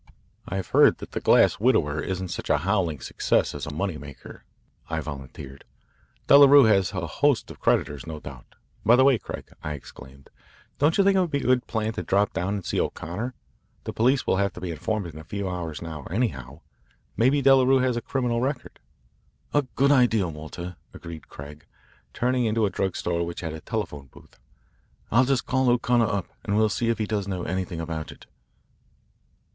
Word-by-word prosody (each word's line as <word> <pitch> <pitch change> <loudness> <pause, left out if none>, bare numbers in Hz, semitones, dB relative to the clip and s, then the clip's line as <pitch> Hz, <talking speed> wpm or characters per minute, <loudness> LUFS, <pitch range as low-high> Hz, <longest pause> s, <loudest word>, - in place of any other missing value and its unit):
"I've 95 -1 -4
heard - - +5
that - - -10
'The - - -3
Grass - - +4
Widower' 80 - +2
isn't 95 -1 -4
such - - -6
a - - +4
howling 90 - -1
success - - 0
as - - -6
a - - -4
money 85 +1 -3
maker," 70 -3 -12 0.4
I 80 0 -1
volunteered. 70 -2 -8 0.6
"Delarue 140 0 +8
has 100 -5 +3
a 90 -3 -3
host 140 - +1
of - - -13
creditors, 75 +1 0
no 80 -1 -6
doubt. 65 -4 -12 0.3
By 115 +3 +6
the 130 - +5
way, 135 -4 +4
Craig," - - -8
I 75 - -3
exclaimed, 70 -1 -13 0.5
"don't 150 +3 +3
you 200 - +5
think 195 0 +4
it - - +4
would 180 -2 +1
be 140 -2 -1
a - - -7
good 125 0 +2
plan 110 -1 -2
to - - -4
drop 100 +1 +1
down 95 +3 -1
and 100 - -5
see - - -1
O'Connor? 105 +11 -3 0.5
The - - -5
police 130 +4 +2
will - - +1
have 100 0 0
to - - -9
be 90 -1 -4
informed 105 +5 -2
in 80 -2 -9
a - - -9
few 100 +3 -4
hours 85 -4 -5
now, 80 -3 -7
anyhow. 80 - -3 0.5
Maybe 135 +6 +2
Delarue 135 0 +5
has 125 -2 +1
a 120 - -2
criminal 120 -2 -1
record." 135 0 -4 0.7
"A 145 -3 +2
good 140 +2 +3
idea, 120 -8 +3
Walter," 80 +3 -8 0.2
agreed 80 -2 -10
Craig, 75 +1 -11 0.4
turning 125 - 0
into 110 0 +1
a 100 - -1
drug 95 0 -2
store 85 -1 -1
which 85 0 -5
had 80 -3 -4
a 80 - -8
telephone 75 -11 -4
booth. - - -19 0.7
"I'll 130 +4 +5
just 135 -1 0
call 130 -1 +1
O'Connor 120 -1 +2
up, 100 -3 -1 0.2
and 105 0 -1
we'll 110 0 +3
see 115 +3 -1
if 115 - +1
he 110 - -1
does 105 -2 -2
know 95 -3 -3
anything 90 -1 -3
about 80 -1 -5
it. - - -15
100 Hz, 195 wpm, -25 LUFS, 80-125 Hz, 0.7 s, Delarue